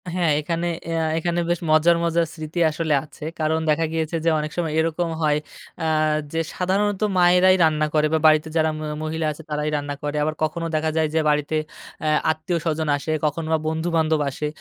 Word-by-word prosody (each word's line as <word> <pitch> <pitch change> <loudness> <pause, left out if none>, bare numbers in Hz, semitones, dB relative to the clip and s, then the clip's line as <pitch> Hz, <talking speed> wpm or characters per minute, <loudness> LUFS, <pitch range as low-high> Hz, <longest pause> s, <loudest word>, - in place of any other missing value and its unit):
হ্যাঁ, 175 -4 +2
এখানে 170 +3 -2 0.2
এয়া 165 -1 0
এখানে 170 +1 -1
বেশ 175 -1 +1
মজার, 160 +2 +5
মজার 170 0 +2
স্মৃতি 155 +1 -5
আসলে 160 0 -1
আছে। 155 0 -13 0.2
কারণ 160 0 +1
দেখা 160 +2 +2
গিয়েছে 160 0 -2
যে, - - +5
অনেক 150 0 -4
সময় 165 -3 -1
এরকম 165 +1 0
হয় 150 -1 +2 0.5
আহ 155 -1 +2 0.2
যে 165 - 0 0.2
সাধারণত 195 +2 0 0.2
মায়েরাই 180 +1 +5
রান্না 155 -1 +2
করে 155 -1 +3
বা, 160 - +3
বাড়িতে 155 0 +5
যারা 160 0 +3
ম - - -7 0.2
মহিলা 160 +1 -2
আছে, 150 - -9
তারাই 150 0 -1
রান্না 145 0 -3
করে। 145 0 -2
আবার 155 +1 -1
কখনো 165 +2 -1
দেখা 155 +1 +1
যায় 160 -1 +3
যে, 160 - +2
বাড়িতে 150 +1 0 0.5
আ - - +1 0.2
আত্মীয়স্বজন 160 -1 -2
আসে, 150 +2 -4
কখনো 155 +2 -1
বা - - +4
বন্ধু-বান্ধব 160 -1 +1
আসে। 150 +2 -4
160 Hz, 190 wpm, -22 LUFS, 155-170 Hz, 0.5 s, মজার